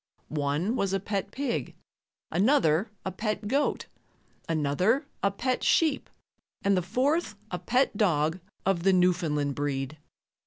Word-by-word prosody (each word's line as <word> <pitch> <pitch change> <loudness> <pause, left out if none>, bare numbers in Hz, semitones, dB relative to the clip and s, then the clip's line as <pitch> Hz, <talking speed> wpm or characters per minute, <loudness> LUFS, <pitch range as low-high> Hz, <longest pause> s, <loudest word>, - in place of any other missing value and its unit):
One 150 - 0
was 195 -5 0
a 195 - +2
pet 200 0 -3
pig, 255 +1 -3 0.6
another 190 - +3 0.2
a 190 - -1
pet 215 +2 -3
goat, 280 +6 0 0.6
another 165 - +1 0.2
a 200 - +3
pet 250 +6 -2
sheep 315 -4 +2 0.5
and 200 0 +3
the 180 - +2
fourth 255 - 0 0.2
a 180 - -2
pet 255 -1 +1
dog 165 -5 +2 0.3
of 190 -3 +2
the 195 +2 +4
Newfoundland 170 -6 +2
breed. 145 +1 -3
195 Hz, 130 wpm, -28 LUFS, 160-225 Hz, 0.6 s, the